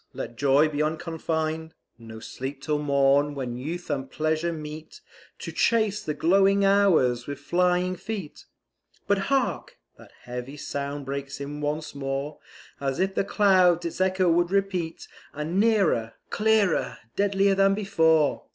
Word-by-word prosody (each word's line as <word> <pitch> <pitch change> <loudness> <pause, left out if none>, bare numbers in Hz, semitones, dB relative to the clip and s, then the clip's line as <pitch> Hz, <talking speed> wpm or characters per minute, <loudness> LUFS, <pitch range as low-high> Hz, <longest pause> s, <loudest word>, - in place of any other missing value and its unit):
let 120 - -6
joy 140 +4 +4
be 150 -1 -2
unconfined; 160 0 -2 0.2
No 110 -1 -10
sleep 135 +4 -6
till 150 +1 -1
morn, 140 0 +2
when 125 -3 -4
Youth 165 +5 -5
and 135 -2 -3
Pleasure 155 +3 -1
meet 155 - -8 0.4
To - - -7
chase 215 -3 +1
the 150 - -3
glowing 195 +5 +3
Hours 170 -12 +3
with 140 -1 -5
flying 180 +4 +1
feet 195 -3 -7 0.6
But, 200 -1 +2
hark! 270 -2 -1 0.2
that - - -15
heavy 125 +3 -7
sound 140 0 -4
breaks 140 0 -5
in 145 +1 -6
once 150 +1 -3
more, 140 +1 -4 0.4
As 135 +1 -2
if 190 +1 +1
the - - +1
clouds 185 -4 +3
its 170 +2 -4
echo 185 -1 +2
would 175 +1 +3
repeat; 190 -4 -2 0.3
And 155 +6 -2
nearer, 195 - +2 0.2
clearer, 215 -4 +2 0.2
deadlier 200 0 +2
than 195 0 +3
before! 160 -7 +2
160 Hz, 140 wpm, -25 LUFS, 140-195 Hz, 0.6 s, joy